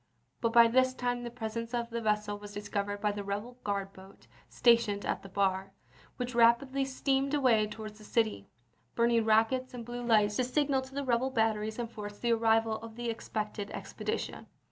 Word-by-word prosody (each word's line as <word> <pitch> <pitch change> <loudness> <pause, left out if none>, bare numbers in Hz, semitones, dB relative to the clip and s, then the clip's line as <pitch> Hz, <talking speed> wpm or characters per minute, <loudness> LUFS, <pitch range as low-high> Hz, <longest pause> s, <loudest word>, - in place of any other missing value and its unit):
But 230 - +1
by 235 0 +8
this 255 +2 +3
time 245 -1 -1
the 240 - -5
presence 230 0 -4
of 235 -1 -2
the 235 0 -2
vessel 210 -1 0
was 205 0 -10
discovered 205 0 -3
by 210 0 +2
the 205 0 -5
rebel 210 +5 -5
guard 200 -1 -2
boat 190 +1 -15 0.2
stationed 230 -4 +3
at - - -1
the 195 - -11
bar, 190 0 0 0.4
which 250 0 -3
rapidly 240 +4 +4
steamed 270 +1 0
away 235 -7 +3
towards 215 0 -8
the - - -13
city, 215 - 0 0.5
burning 235 -1 +3
rockets 250 +4 +2
and 235 -2 -7
blue 240 +1 -5
lights 210 -3 +3
to 255 - +2
signal 270 +1 +1
to 260 +1 -11
the 280 - -1
rebel 250 +1 +1
bat 225 -3 +2
teries 215 +1 -4
and 235 -1 -4
forts 205 -2 -7
the 235 +1 +1
arrival 225 -1 +2
of 225 0 -10
the 240 0 -2
expected 215 -2 -4
expedi - - -4
tion. - - -7
230 Hz, 195 wpm, -31 LUFS, 210-245 Hz, 0.5 s, by